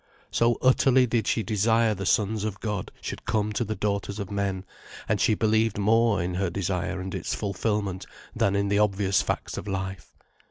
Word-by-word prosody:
So 115 Hz, 0 st, +2 dB
utterly 130 Hz, 0 st, +5 dB
did 115 Hz, -3 st, 0 dB
she 110 Hz, -, +1 dB
desire 110 Hz, +2 st, +2 dB
the 95 Hz, -1 st, -4 dB
Sons 105 Hz, 0 st, +1 dB
of 105 Hz, -2 st, -3 dB
God 105 Hz, -4 st, -3 dB
should -, -, -6 dB
come 105 Hz, -1 st, 0 dB
to 120 Hz, -, 0 dB
the 110 Hz, -1 st, -3 dB
daughters 100 Hz, -1 st, -2 dB
of 100 Hz, -1 st, -5 dB
men; 100 Hz, -2 st, -2 dB, 0.4 s
and -, -, +1 dB
she 110 Hz, -, +3 dB
believed 110 Hz, 0 st, +2 dB
more 110 Hz, -1 st, +3 dB
in 90 Hz, +1 st, -3 dB
her 95 Hz, 0 st, 0 dB
desire 95 Hz, +1 st, -2 dB
and 95 Hz, 0 st, -5 dB
its 95 Hz, -3 st, -3 dB
fulfilment 100 Hz, -2 st, -2 dB, 0.3 s
than 100 Hz, 0 st, +2 dB
in 100 Hz, 0 st, +1 dB
the 100 Hz, 0 st, +2 dB
obvious 100 Hz, -2 st, +2 dB
facts -, -, -3 dB
of -, -, -9 dB
life. 95 Hz, -1 st, -4 dB
100 Hz, 190 wpm, -26 LUFS, 95-110 Hz, 0.4 s, utterly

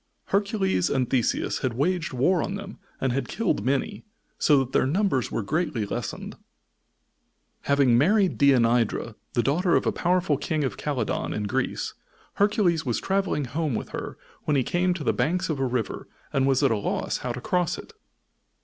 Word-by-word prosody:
Hercules 195 Hz, -, +1 dB
and 130 Hz, -3 st, +1 dB
Theseus 125 Hz, -2 st, 0 dB
had 125 Hz, -3 st, -2 dB
waged 165 Hz, +4 st, 0 dB
war 150 Hz, +7 st, +2 dB
on 195 Hz, -, -3 dB
them 200 Hz, 0 st, -8 dB, 0.2 s
and 130 Hz, -2 st, 0 dB
had 135 Hz, -, -1 dB
killed 210 Hz, -, -1 dB
many, 140 Hz, -, -1 dB, 0.4 s
so 150 Hz, -, +5 dB
that 135 Hz, -1 st, 0 dB
their -, -, +2 dB
numbers 160 Hz, -, +1 dB
were 115 Hz, -, -1 dB
greatly 150 Hz, -, -1 dB
lessened. -, -, -5 dB, 1.3 s
Having 140 Hz, -4 st, +4 dB
married 195 Hz, -, +3 dB
Deianira, 120 Hz, -4 st, +3 dB, 0.2 s
the 120 Hz, -, +2 dB
daughter 170 Hz, +5 st, +2 dB
of -, -, +2 dB
a -, -, +2 dB
powerful 175 Hz, -4 st, +1 dB
King 155 Hz, +1 st, -1 dB
of 135 Hz, -, -2 dB
Calydon, 130 Hz, -7 st, -2 dB
in 105 Hz, -, -2 dB
Greece, 105 Hz, -, -2 dB, 0.4 s
Hercules 200 Hz, -6 st, +2 dB
was 120 Hz, -4 st, -1 dB
traveling 190 Hz, -7 st, 0 dB
home 150 Hz, 0 st, -2 dB
with -, -, -4 dB
her -, -, -6 dB, 0.3 s
when 150 Hz, -, +2 dB
he 130 Hz, -, +2 dB
came 175 Hz, +5 st, +1 dB
to 165 Hz, -, -5 dB
the -, -, +2 dB
banks 180 Hz, +4 st, 0 dB
of 150 Hz, -4 st, -1 dB
a 135 Hz, -, +1 dB
river 120 Hz, -3 st, -3 dB, 0.3 s
and 135 Hz, 0 st, +2 dB
was 135 Hz, +1 st, +2 dB
at 135 Hz, -, +4 dB
a 110 Hz, -, +2 dB
loss 100 Hz, -, -2 dB
how 125 Hz, -, -4 dB
to 125 Hz, -, -5 dB
cross 175 Hz, +5 st, 0 dB
it. -, -, -11 dB
145 Hz, 180 wpm, -25 LUFS, 125-180 Hz, 1.3 s, so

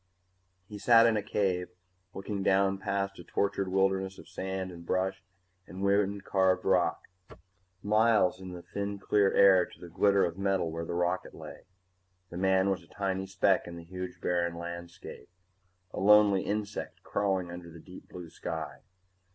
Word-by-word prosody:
He 105 Hz, -1 st, -9 dB
sat 115 Hz, +1 st, +6 dB
in 115 Hz, -1 st, +3 dB
a 105 Hz, -, 0 dB
cave, 90 Hz, -3 st, -1 dB, 0.5 s
looking 100 Hz, +1 st, -4 dB
down 95 Hz, 0 st, +2 dB
past 100 Hz, 0 st, -2 dB
a -, -, -9 dB
tortured 100 Hz, -1 st, -1 dB
wilderness 95 Hz, 0 st, 0 dB
of -, -, -13 dB
sand 95 Hz, -1 st, -4 dB
and 85 Hz, -1 st, -11 dB
bush 95 Hz, +2 st, -1 dB, 0.5 s
and 95 Hz, +2 st, -7 dB
wind 100 Hz, 0 st, +1 dB
carved 95 Hz, -2 st, +1 dB
rock, -, -, +2 dB, 0.8 s
miles 105 Hz, -3 st, +3 dB
in 95 Hz, -1 st, -8 dB
the 90 Hz, -1 st, -9 dB
thin 100 Hz, 0 st, -4 dB
clear 100 Hz, 0 st, +2 dB
air 95 Hz, -2 st, +6 dB
to -, -, -17 dB
the 90 Hz, -, -10 dB
glitter 100 Hz, +3 st, +3 dB
of 85 Hz, +2 st, -5 dB
metal 95 Hz, -4 st, 0 dB
where 85 Hz, +1 st, -4 dB
the 85 Hz, -, -4 dB
rocket 90 Hz, +1 st, -1 dB
lay. -, -, -11 dB, 0.6 s
The 85 Hz, -, -6 dB
man 95 Hz, +1 st, +2 dB
was 95 Hz, -1 st, -2 dB
a 85 Hz, -, -19 dB
tiny 95 Hz, -1 st, -3 dB
speck 95 Hz, 0 st, +1 dB
in 85 Hz, -, -8 dB
the 85 Hz, -, -9 dB
huge 90 Hz, +2 st, -7 dB
barren 85 Hz, -1 st, -1 dB
landscape, 85 Hz, -6 st, -8 dB, 0.6 s
a -, -, -4 dB
lonely 105 Hz, -1 st, +5 dB
insect 105 Hz, 0 st, -4 dB
crawling 95 Hz, -3 st, -1 dB
under 85 Hz, -1 st, -9 dB
the 85 Hz, -, -12 dB
deep 90 Hz, +3 st, -13 dB
blue 85 Hz, -3 st, -9 dB
sky. -, -, -6 dB
95 Hz, 165 wpm, -29 LUFS, 90-100 Hz, 0.8 s, sat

